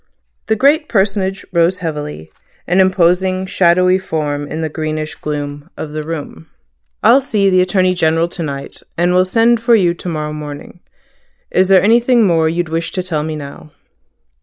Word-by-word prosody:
The 220 Hz, -, +2 dB
great 290 Hz, +6 st, +2 dB
personage 195 Hz, -1 st, 0 dB
rose 170 Hz, +2 st, +2 dB
heavily, 150 Hz, -, -6 dB, 0.3 s
an 180 Hz, +2 st, +1 dB
imposing 185 Hz, 0 st, +2 dB
shadowy 185 Hz, 0 st, +3 dB
form 145 Hz, -5 st, -3 dB
in 160 Hz, -, -5 dB
the 160 Hz, -, -1 dB
greenish 155 Hz, 0 st, -4 dB
gloom 145 Hz, +1 st, -6 dB
of 150 Hz, -, -6 dB
the 155 Hz, 0 st, -4 dB
room. 150 Hz, -, -7 dB, 0.5 s
"I'll 245 Hz, +5 st, +6 dB
see 205 Hz, -7 st, +1 dB
the 185 Hz, 0 st, +4 dB
Attorney 185 Hz, 0 st, +2 dB
General 165 Hz, -1 st, +1 dB
to 175 Hz, -, -7 dB
night, 140 Hz, -3 st, -6 dB, 0.2 s
and 175 Hz, +1 st, +2 dB
will 185 Hz, 0 st, +4 dB
send 230 Hz, +4 st, +2 dB
for 230 Hz, 0 st, +4 dB
you 180 Hz, -5 st, +2 dB
to 175 Hz, +1 st, -7 dB
morrow 150 Hz, -2 st, -4 dB
morning. 150 Hz, +2 st, -8 dB, 0.7 s
Is 185 Hz, 0 st, +3 dB
there 190 Hz, -1 st, +5 dB
anything 235 Hz, +2 st, +4 dB
more 165 Hz, -3 st, +2 dB
you'd 170 Hz, 0 st, -2 dB
wish 165 Hz, +1 st, -3 dB
to 185 Hz, -, -2 dB
tell 165 Hz, -4 st, -2 dB
me 155 Hz, +1 st, -4 dB
now?" 145 Hz, +1 st, -10 dB
175 Hz, 170 wpm, -16 LUFS, 155-190 Hz, 0.7 s, I'll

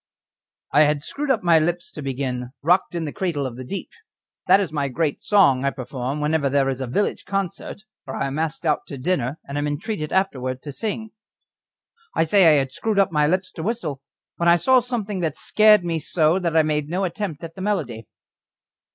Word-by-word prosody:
I 145 Hz, -, +5 dB
had 145 Hz, -1 st, 0 dB
screwed 290 Hz, -, -4 dB
up 230 Hz, -6 st, +2 dB
my 170 Hz, -2 st, +5 dB
lips 170 Hz, +2 st, -2 dB
to 150 Hz, -, -8 dB
begin 130 Hz, -2 st, -3 dB
"Rocked 180 Hz, +3 st, +2 dB
in 165 Hz, -2 st, -2 dB
the 150 Hz, -, -4 dB
cradle 165 Hz, -7 st, -2 dB
of 125 Hz, -3 st, -5 dB
the 130 Hz, -, -7 dB
deep" 185 Hz, +10 st, -6 dB, 0.6 s
that 195 Hz, -, +7 dB
is 185 Hz, -6 st, -2 dB
my 145 Hz, -2 st, 0 dB
great 150 Hz, +2 st, -1 dB
song 140 Hz, -11 st, +4 dB
I 140 Hz, -, +2 dB
perform 130 Hz, +1 st, -4 dB
whenever 150 Hz, -1 st, +1 dB
there 135 Hz, 0 st, +2 dB
is 135 Hz, 0 st, -3 dB
a 130 Hz, -, -3 dB
village 205 Hz, +12 st, -1 dB
concert, 195 Hz, +1 st, -4 dB, 0.2 s
or 130 Hz, -, -5 dB
I -, -, -1 dB
am 135 Hz, +2 st, -3 dB
asked 160 Hz, +1 st, -3 dB
out 150 Hz, -2 st, 0 dB
to 140 Hz, -, -7 dB
dinner, 135 Hz, -1 st, -1 dB
and 140 Hz, +1 st, -3 dB
am 145 Hz, -, -1 dB
entreated 155 Hz, +2 st, -3 dB
afterwards 130 Hz, -9 st, -1 dB
to 145 Hz, -, -7 dB
sing 220 Hz, +6 st, -4 dB, 1.0 s
I -, -, +3 dB
say 185 Hz, +2 st, +5 dB
I 155 Hz, -2 st, +6 dB
had 135 Hz, -1 st, 0 dB
screwed 220 Hz, +7 st, -2 dB
up 195 Hz, -3 st, +3 dB
my 150 Hz, -2 st, +2 dB
lips 185 Hz, +3 st, 0 dB
to -, -, -7 dB
whistle, 165 Hz, -, -3 dB, 0.4 s
when 170 Hz, 0 st, +3 dB
I 170 Hz, -, +7 dB
saw 255 Hz, +10 st, +4 dB
something 225 Hz, -5 st, -3 dB
that 160 Hz, -4 st, -1 dB
scared 210 Hz, -1 st, +4 dB
me 165 Hz, -1 st, -1 dB
so 160 Hz, +3 st, +2 dB
that 170 Hz, -3 st, 0 dB
I 160 Hz, -, +6 dB
made 150 Hz, -1 st, -1 dB
no 185 Hz, +3 st, -1 dB
attempt 180 Hz, -4 st, -4 dB
at 165 Hz, 0 st, -7 dB
the 190 Hz, -, -9 dB
melody. 140 Hz, -, -2 dB
160 Hz, 210 wpm, -22 LUFS, 140-190 Hz, 1.0 s, that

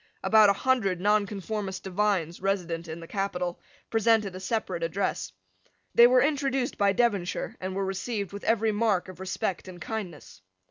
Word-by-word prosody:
About 215 Hz, -2 st, +6 dB
a -, -, +5 dB
hundred 200 Hz, -6 st, +1 dB
Nonconformist 205 Hz, 0 st, -1 dB
divines, 190 Hz, -4 st, 0 dB
resident 175 Hz, -4 st, -1 dB
in 160 Hz, +1 st, -6 dB
the 165 Hz, -, -10 dB
capital, 180 Hz, -3 st, -2 dB, 0.3 s
presented 220 Hz, -3 st, +2 dB
a -, -, -6 dB
separate 190 Hz, -3 st, -2 dB
address. 180 Hz, +4 st, -2 dB, 0.6 s
They 235 Hz, -, +8 dB
were 250 Hz, +1 st, +5 dB
introduced 275 Hz, -3 st, 0 dB
by 200 Hz, -1 st, +3 dB
Devonshire, 205 Hz, -6 st, 0 dB
and 185 Hz, 0 st, -4 dB
were 195 Hz, 0 st, -1 dB
received 200 Hz, +1 st, -3 dB
with 200 Hz, -, -7 dB
every 225 Hz, -1 st, +2 dB
mark 205 Hz, -4 st, +1 dB
of 185 Hz, -, -11 dB
respect 190 Hz, -1 st, -3 dB
and 180 Hz, -1 st, -9 dB
kindness. 175 Hz, -, -6 dB
200 Hz, 155 wpm, -27 LUFS, 185-220 Hz, 0.6 s, They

